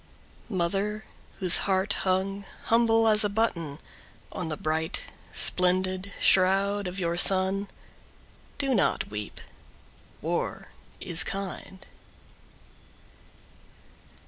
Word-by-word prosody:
Mother 200 +3 -1 0.3
whose 180 -3 +6
heart 190 +1 +2
hung 195 +1 -1 0.3
humble 225 -1 +4
as 215 0 +5
a 205 - +1
button 170 -9 -1 0.5
On 180 -3 -5
the 155 - -4
bright 160 +1 -2 0.3
splendid 185 +1 0
shroud 195 +1 +3
of 180 +2 -5
your 170 -1 -1
son, 190 +2 +4 0.9
Do 275 -2 0
not 195 - 0
weep. 105 0 -6 0.8
War - - -3 0.3
is 170 -1 +2
kind. 190 -1 -7
190 Hz, 90 wpm, -27 LUFS, 180-200 Hz, 0.9 s, whose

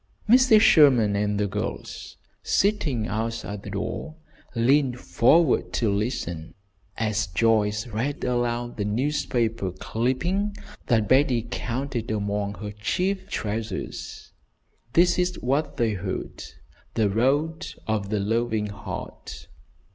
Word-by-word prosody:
Mrs. 240 -2 +6
Sherman 130 - +6
and 105 0 0
the 105 - +2
girls, 105 +1 -5 0.2
sitting 160 - +1
outside 110 -2 -3
the 100 - -8
door, 110 +10 -4 0.4
leaned 125 +1 +3
forward 155 +6 +3
to 110 -4 +1
listen, 95 -7 -3 0.4
as 105 -2 0
Joyce 105 +2 +2
read 125 +6 -3
aloud 120 -1 -1
the 105 - -1
newspaper 115 -3 0
clipping 165 - -1 0.3
that 110 -4 +2
Betty 130 -2 +3
counted 125 -1 -3
among 105 -1 -1
her 105 0 -6
chief 185 - -2
treasures. 105 -1 -4 0.6
This 175 +1 +4
is 180 0 +1
what 140 +5 -1
they 115 -2 +1
heard: 95 -1 -5 0.5
"THE 110 -2 +3
ROAD 145 - +1 0.2
OF 105 -2 -1
THE 105 -1 0
LOVING 110 0 0
HEART." 100 - -8
115 Hz, 115 wpm, -25 LUFS, 105-140 Hz, 0.6 s, Mrs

